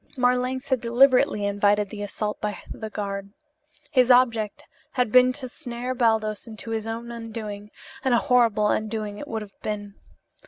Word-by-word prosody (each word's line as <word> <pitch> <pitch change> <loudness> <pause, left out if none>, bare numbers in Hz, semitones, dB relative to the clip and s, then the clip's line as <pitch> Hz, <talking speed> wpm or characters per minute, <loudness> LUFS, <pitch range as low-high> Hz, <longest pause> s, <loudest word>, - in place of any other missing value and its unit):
Marlanx 250 +2 +1
had 260 -3 +1
deliberately 250 -1 +4
invited 205 0 +2
the 210 - -6
assault 210 +1 -3
by 210 -1 -2
the 220 - -6
guard. 200 -1 -4 0.6
His 255 -2 +4
object 235 -4 +3 0.3
had 250 -4 +1
been 255 +1 +6
to 260 -1 -5
snare 250 -1 -5
Baldos 220 -3 +1
into 225 0 -7
his 225 0 -2
own 230 +1 -5
undoing, 220 -3 -6 0.3
and 260 -3 +3
a - - +5
horrible 230 -5 +3
undoing 215 -1 -2
it 290 - -7
would 220 -4 -3
have 200 -2 -13
been. 205 -1 -4
225 Hz, 160 wpm, -25 LUFS, 210-250 Hz, 0.6 s, been